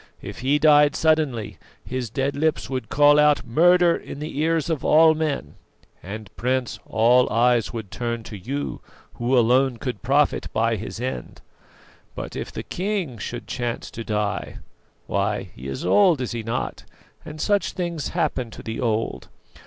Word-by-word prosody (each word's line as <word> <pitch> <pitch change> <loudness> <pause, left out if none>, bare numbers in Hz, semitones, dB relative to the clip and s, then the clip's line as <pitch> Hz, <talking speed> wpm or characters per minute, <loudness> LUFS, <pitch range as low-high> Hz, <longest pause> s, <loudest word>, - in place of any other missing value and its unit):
If - - -7
he 135 +3 +2
died 150 -1 +5
suddenly, 150 -9 +1 0.3
his 130 -2 -4
dead 135 +5 -1
lips 155 -2 0
would 130 -4 -3
call 145 0 +5
out 150 0 +4
'Murder!' 175 +7 +4
in - - -8
the 150 +2 -6
ears 160 0 +1
of 160 -4 -2
all 160 +1 +6
men; 150 - -2 0.5
and, 105 +2 -8
Prince, 125 0 -1
all 120 +3 +4
eyes 120 -2 +3
would 110 -5 -7
turn 115 +3 -3
to 105 - -9
you, 135 +9 -4 0.4
who 125 +2 +2
alone 125 +2 +3
could 125 -4 -5
profit 140 +4 +1
by 115 +1 +1
his 110 +2 -6
end. 130 +2 -5 0.7
But - - -6
if - - -5
the - - -6
king 180 - -3
should 120 +4 -5
chance 120 -2 -4
to 115 - -6
die 105 -1 -2 0.5
why - - -1
he 65 +2 -8
is 65 - -5
old, 185 -8 +4
is 125 - -3
he 120 -1 -3
not? 115 +2 -4 0.4
and 155 -1 -9
such 205 +4 +1
things 170 -5 -3
happen 150 -8 -1
to - - -11
the 110 0 -5
old. 115 -2 -2
130 Hz, 165 wpm, -23 LUFS, 115-155 Hz, 0.7 s, all